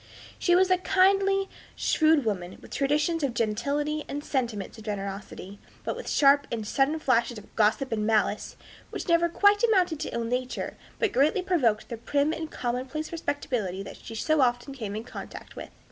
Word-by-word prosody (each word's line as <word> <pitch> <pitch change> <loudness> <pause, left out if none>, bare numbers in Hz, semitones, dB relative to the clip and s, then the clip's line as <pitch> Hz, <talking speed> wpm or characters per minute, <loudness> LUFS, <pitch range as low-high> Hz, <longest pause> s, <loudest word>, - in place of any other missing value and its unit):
She 350 - +3
was 370 +1 +4
a 365 - +4
kindly, 390 +1 +3 0.3
shrewd 310 -4 +3
woman, 185 -4 -3
with - - -15
traditions 295 +4 +1
of 270 -5 -1
gentility 285 +8 -1
and 290 +1 -4
sentiments 230 -8 -3
of - - -11
generosity, 200 -1 -6 0.2
but - - -2
with - - -6
sharp 285 0 +4
and 225 -2 -3
sudden 275 +7 +2
flashes 240 -5 +1
of 210 - -13
gossip 220 +5 +2
and 215 -2 0
malice, 215 -1 +1 0.3
which - - -6
never 340 0 +3
quite 405 +4 +4
amounted 370 -9 +3
to - - -3
ill 235 - -2
nature, 250 +2 -3 0.2
but 450 -4 +1
greatly 295 +8 +3
provoked 250 - +1
the 235 - -5
prim 285 +6 0
and 320 -1 -5
commonplace 255 +5 -3
respectability 245 - -2
that - - -9
she 225 - -9
so 310 +6 +2
often 245 +2 +1
came 215 -6 -5
in 220 - -4
contact 240 - -9
with. - - -8
275 Hz, 175 wpm, -27 LUFS, 225-320 Hz, 0.3 s, was